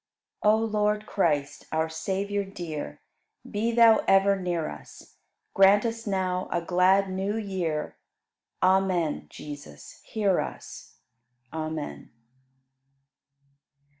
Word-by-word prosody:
97. 210 Hz, +1 st, +5 dB
O 225 Hz, -, 0 dB
Lord 210 Hz, -1 st, 0 dB
Christ, 150 Hz, -9 st, -1 dB
our 160 Hz, 0 st, +1 dB
Savior 195 Hz, +5 st, -2 dB
dear, 160 Hz, -, -7 dB, 0.5 s
Be 220 Hz, +3 st, -1 dB
Thou 230 Hz, -1 st, +6 dB
ever 195 Hz, +1 st, +5 dB
near 175 Hz, -4 st, -2 dB
us; -, -, -12 dB, 0.4 s
Grant 195 Hz, +2 st, +5 dB
us 230 Hz, -1 st, -3 dB
now 185 Hz, -2 st, -1 dB
a 175 Hz, -, +1 dB
glad 185 Hz, +3 st, +3 dB
New 195 Hz, +3 st, -2 dB
Year. 180 Hz, -8 st, -3 dB, 0.7 s
Amen, 185 Hz, -4 st, +2 dB
Jesus, 145 Hz, -, -10 dB
hear 200 Hz, -4 st, +1 dB
us! -, -, -7 dB, 0.6 s
Amen. 155 Hz, -1 st, -5 dB
190 Hz, 105 wpm, -27 LUFS, 160-205 Hz, 0.7 s, Thou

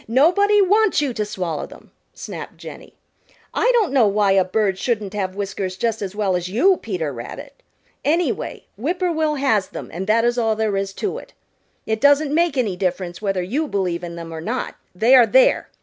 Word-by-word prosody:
Nobody 395 Hz, -, +4 dB
wants 420 Hz, +2 st, +3 dB
you 285 Hz, -4 st, -1 dB
to 215 Hz, -, -2 dB
swallow 180 Hz, -7 st, -4 dB
them," -, -, -16 dB, 0.2 s
snapped -, -, -8 dB
Jenny. -, -, -11 dB, 0.6 s
"I -, -, +2 dB
don't 425 Hz, -, +2 dB
know 250 Hz, -6 st, +5 dB
why 200 Hz, 0 st, +2 dB
a 195 Hz, -1 st, +4 dB
bird 190 Hz, 0 st, 0 dB
shouldn't 215 Hz, -4 st, -2 dB
have 190 Hz, -2 st, -3 dB
whiskers 195 Hz, -2 st, -4 dB
just 225 Hz, +2 st, -1 dB
as 200 Hz, 0 st, -5 dB
well 200 Hz, -3 st, 0 dB
as 180 Hz, 0 st, -3 dB
you, 360 Hz, -, +3 dB
Peter 175 Hz, -, -4 dB
Rabbit. 275 Hz, -, -9 dB, 0.4 s
Anyway, 335 Hz, +4 st, -1 dB
Whip 305 Hz, -, -2 dB
poor 360 Hz, -1 st, 0 dB
will 310 Hz, -2 st, 0 dB
has 260 Hz, -9 st, +1 dB
them -, -, -9 dB
and 185 Hz, +3 st, -5 dB
that 230 Hz, +2 st, +3 dB
is 240 Hz, +1 st, +1 dB
all 225 Hz, -2 st, +1 dB
there 215 Hz, -2 st, -1 dB
is 195 Hz, 0 st, -2 dB
to 410 Hz, -, -3 dB
it. -, -, -15 dB, 0.5 s
It 220 Hz, 0 st, -2 dB
doesn't 285 Hz, +1 st, +4 dB
make 335 Hz, -3 st, +1 dB
any 215 Hz, -7 st, 0 dB
difference 180 Hz, -1 st, -3 dB
whether 195 Hz, -3 st, -1 dB
you 280 Hz, -, -2 dB
believe 180 Hz, -6 st, -2 dB
in 170 Hz, -1 st, -6 dB
them 165 Hz, -1 st, -8 dB
or 160 Hz, -, -6 dB
not, 235 Hz, +9 st, -3 dB, 0.2 s
they 225 Hz, +7 st, +4 dB
are 250 Hz, -3 st, +7 dB
there. -, -, +3 dB
215 Hz, 200 wpm, -21 LUFS, 190-285 Hz, 0.6 s, are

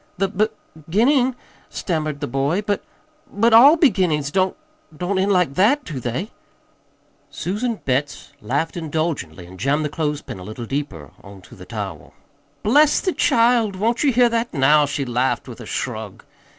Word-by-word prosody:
"The 195 Hz, +1 st, 0 dB
b 215 Hz, +2 st, +1 dB, 0.3 s
beginning?" 240 Hz, -, +1 dB, 0.3 s
stammered 155 Hz, -4 st, -3 dB
the -, -, -2 dB
boy. 140 Hz, -, -1 dB
"But 205 Hz, -1 st, -1 dB, 0.5 s
but 225 Hz, +3 st, +2 dB
ALL 275 Hz, +8 st, +8 dB
beginnings 180 Hz, -, +2 dB
don't 190 Hz, -, 0 dB, 0.4 s
don't 190 Hz, +4 st, -1 dB
end 195 Hz, +2 st, +1 dB
like 180 Hz, -7 st, +2 dB
that, 235 Hz, -, +3 dB
do 150 Hz, -6 st, -5 dB
they?" 125 Hz, -, -4 dB, 1.0 s
Susan 220 Hz, +6 st, -3 dB
Betts 140 Hz, +3 st, -2 dB
laughed 145 Hz, +7 st, -2 dB
indulgently 155 Hz, -, -3 dB
and 90 Hz, +1 st, -13 dB
jammed 145 Hz, +7 st, 0 dB
the -, -, -2 dB
clothespin 150 Hz, -, -4 dB
a -, -, -9 dB
little 110 Hz, +4 st, -7 dB
deeper 105 Hz, -, -5 dB
on 100 Hz, -1 st, -13 dB
to 90 Hz, -, -15 dB
the 90 Hz, -, -12 dB
towel. 100 Hz, -9 st, -7 dB, 0.5 s
"Bless 290 Hz, +7 st, +4 dB
the 370 Hz, -, -1 dB
child! 230 Hz, -3 st, +2 dB
Won't 230 Hz, +7 st, 0 dB
ye 285 Hz, -, +4 dB
hear 245 Hz, 0 st, +4 dB
that, 235 Hz, 0 st, -1 dB
now?" 145 Hz, +1 st, +4 dB
she 140 Hz, 0 st, -3 dB
laughed 125 Hz, +1 st, -1 dB
with -, -, -10 dB
a -, -, -9 dB
shrug. -, -, -5 dB
165 Hz, 165 wpm, -21 LUFS, 135-215 Hz, 1.0 s, ALL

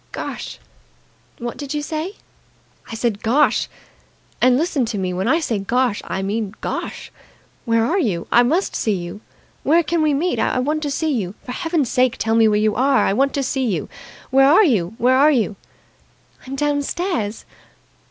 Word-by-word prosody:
"Gosh!" -, -, -6 dB, 0.8 s
"What 240 Hz, -1 st, -5 dB
did 285 Hz, 0 st, -5 dB
you 295 Hz, -, -2 dB
say?" 320 Hz, +7 st, -4 dB, 0.8 s
"I -, -, -4 dB
said 225 Hz, -3 st, -1 dB
Gosh! 275 Hz, +7 st, +2 dB, 0.7 s
And 250 Hz, 0 st, +5 dB
listen 310 Hz, -3 st, 0 dB
to 225 Hz, -2 st, -4 dB
me, 185 Hz, -2 st, -2 dB
when 185 Hz, +4 st, -2 dB
I 320 Hz, +6 st, +3 dB
say 235 Hz, -10 st, -1 dB
Gosh, 240 Hz, +2 st, 0 dB
I 190 Hz, -, -3 dB
mean 210 Hz, +1 st, -3 dB
Gosh! -, -, -5 dB, 0.5 s
Where 230 Hz, -1 st, +2 dB
are 350 Hz, +10 st, +1 dB
you? 195 Hz, -, -1 dB
I 240 Hz, -, +6 dB
must 320 Hz, +11 st, +1 dB
see 215 Hz, -3 st, 0 dB
you. 175 Hz, +3 st, -6 dB, 0.4 s
Where 335 Hz, +4 st, +3 dB
can 330 Hz, +2 st, 0 dB
we 305 Hz, -2 st, +2 dB
meet? 350 Hz, +6 st, 0 dB
I -, -, +1 dB
want 300 Hz, +5 st, 0 dB
to 295 Hz, -, -2 dB
see 310 Hz, +2 st, -1 dB
you! 200 Hz, -6 st, -3 dB
For 250 Hz, -, -6 dB
Heaven's 325 Hz, -2 st, -1 dB
sake, 255 Hz, -1 st, +2 dB
tell 225 Hz, -, 0 dB
me 225 Hz, -1 st, +5 dB
where 210 Hz, -1 st, +2 dB
you 215 Hz, 0 st, +2 dB
are. 265 Hz, +4 st, +3 dB
I -, -, +1 dB
want 275 Hz, +6 st, +2 dB
to 280 Hz, -, 0 dB
see 265 Hz, +1 st, -1 dB
you! 175 Hz, -9 st, -2 dB, 0.4 s
Where 270 Hz, +1 st, +5 dB
are 395 Hz, +6 st, +6 dB
you? 210 Hz, -, +1 dB
Where 255 Hz, +2 st, +3 dB
are 295 Hz, +2 st, +6 dB
you?" 230 Hz, -8 st, +1 dB, 0.9 s
"I'm 270 Hz, -, -5 dB
downstairs." 290 Hz, -, -2 dB
255 Hz, 185 wpm, -20 LUFS, 220-295 Hz, 0.9 s, I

